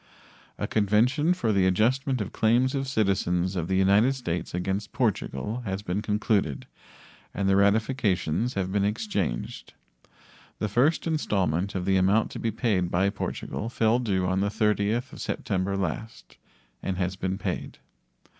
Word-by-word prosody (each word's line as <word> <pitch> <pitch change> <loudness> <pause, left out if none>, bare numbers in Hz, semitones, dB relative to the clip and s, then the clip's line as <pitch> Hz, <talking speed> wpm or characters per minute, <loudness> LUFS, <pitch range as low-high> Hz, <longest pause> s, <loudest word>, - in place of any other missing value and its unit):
A - - -2
convention 110 - +2
for 125 -12 +1
the 95 -2 +3
adjustment 125 +7 +1
of 100 - -5
claims 120 +4 +2
of 135 -1 -2
citizens 95 -6 0
of 85 -3 -2
the 95 - 0
United 100 +7 +4
States 90 -10 -3
against 95 +3 -3
Portugal 110 - -1
has 95 -2 -4
been 95 +1 -2
concluded 105 - 0 0.7
and 100 - 0
the 95 - +4
ratifications 105 - +1
have 95 -1 -1
been 100 0 +1
exchanged. 100 - -3 0.8
The 105 - -1
first 135 +10 +2
installment 100 - 0
of 90 -1 -2
the 95 0 +3
amount 95 +4 +2
to - - -6
be 115 - -1
paid 105 -6 0
by 95 +3 +2
Portugal 105 +2 -4
fell 115 0 +2
due 95 -6 0
on 95 +1 +1
the 100 +1 +1
30th 105 +4 0
of - - -9
September 100 0 -2
last 100 +4 -5 0.5
and 95 -2 -3
has 90 0 -1
been 95 0 -2
paid. - - -4
100 Hz, 155 wpm, -26 LUFS, 95-115 Hz, 0.8 s, United